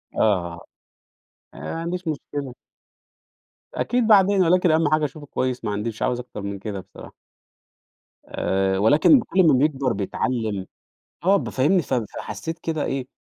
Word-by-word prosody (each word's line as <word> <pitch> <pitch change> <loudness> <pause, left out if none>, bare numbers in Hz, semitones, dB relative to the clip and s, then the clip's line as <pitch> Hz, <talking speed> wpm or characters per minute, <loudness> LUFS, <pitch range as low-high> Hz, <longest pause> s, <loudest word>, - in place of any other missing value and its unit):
آه. 85 -5 +1 0.9
آآ - - -12
ما 80 - -5
عنديش 180 +1 -4
مشكلة. 145 -3 -4 1.2
أكيد 245 -1 0
بعدين، 200 -2 +5
ولكن 180 0 +3
أهَم 160 -1 +3
حاجة 155 0 +2
أشوفه 150 +1 -7
كويس 130 -4 -3
ما 105 - -1
عنديش 105 +3 -3
مش - - -14
عاوز 125 -1 0
أكتر 125 -4 -8
من 100 -1 -5
كده 100 -1 -5
بصراحة. 95 - -13 1.1
آآ 95 0 0
ولكن 145 - +5
كل 190 -3 +2
ما 150 - +6
بيكبر 135 -2 +1
بيتعلّم 105 0 -2 0.6
آه. 195 +2 +5
ب - - -4
فاهمني؟ 165 +8 +2
ف 135 - -5
فحسّيت 115 +5 -4
كده 160 -2 -2
إيه، 135 -2 -3
135 Hz, 150 wpm, -23 LUFS, 105-165 Hz, 1.2 s, ما